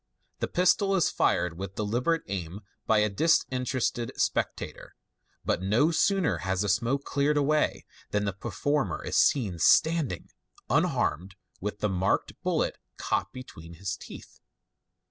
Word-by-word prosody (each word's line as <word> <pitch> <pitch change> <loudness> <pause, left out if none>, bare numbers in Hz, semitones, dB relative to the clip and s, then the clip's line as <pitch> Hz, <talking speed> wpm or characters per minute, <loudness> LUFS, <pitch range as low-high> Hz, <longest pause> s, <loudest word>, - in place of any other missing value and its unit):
The - - -1
pistol 195 +2 +2
is 180 - +2
fired 90 -1 +1
with 95 0 -6
deliberate 120 +11 0
aim 95 0 -5 0.3
by 110 - +4
a 105 0 +4
dis 155 +11 +3
interested 125 -2 -1
spectator, - - -2 0.5
but - - 0
no 110 - +3
sooner 190 0 +2
has 95 0 -1
the 105 - 0
smoke 120 +7 +1
cleared 145 +2 +1
away 150 +1 +1 0.2
than 105 0 0
the 100 - -1
performer 135 +8 -2
is - - -3
seen 105 - +3
standing 155 - +3 0.4
unharmed, 95 +5 +1 0.2
with 105 +1 -5
the 105 - +1
marked 95 0 0
bullet - - 0 0.2
caught - - -1
between 85 -10 -10
his 95 +2 -4
teeth. - - -12
110 Hz, 140 wpm, -28 LUFS, 95-145 Hz, 0.5 s, by